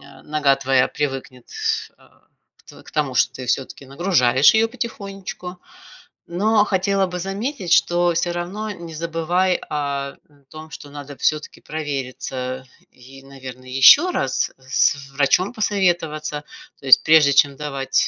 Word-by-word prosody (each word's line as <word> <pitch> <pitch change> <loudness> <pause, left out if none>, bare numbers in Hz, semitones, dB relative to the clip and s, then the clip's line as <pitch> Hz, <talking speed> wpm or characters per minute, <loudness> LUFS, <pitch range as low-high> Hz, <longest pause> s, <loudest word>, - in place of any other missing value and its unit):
э, - - -16
нога 150 -2 +2
твоя 135 -1 +2
привыкнет, 135 -3 -5
тс 440 0 -3
а, - - -25 0.4
к - - -15
к - - -14
тому, 145 -4 -1
что - - +3
ты 130 -1 -7
всё-таки 135 +2 -3
нагружаешь 135 - +3
её 225 +1 +3
потихонечку. 195 -6 -7 0.7
Но 210 +5 +2
хотела 195 -1 +1
бы 180 0 -5
заметить, 195 - -2
что 175 +1 +3
всё 175 +1 0
равно 195 +5 -4
не 170 -4 -9
забывай 170 +3 0
о, 140 -2 -3 0.2
м, 145 -2 -27
том, 155 0 -11
что 145 - -11
надо 145 -1 -10
всё-таки 155 +4 -1
провериться 130 -3 -5 0.3
и, 135 +2 -15
наверно, 130 -2 -11
ещё 135 - +6
раз 135 - -1
с 135 +1 0
врачом 145 +7 +2
посоветоваться. 170 -8 -1 0.3
То - - -15
есть, 130 - +8
прежде 155 -3 +5
чем 140 0 +3
давать 140 -2 -1
155 Hz, 145 wpm, -21 LUFS, 135-185 Hz, 0.7 s, есть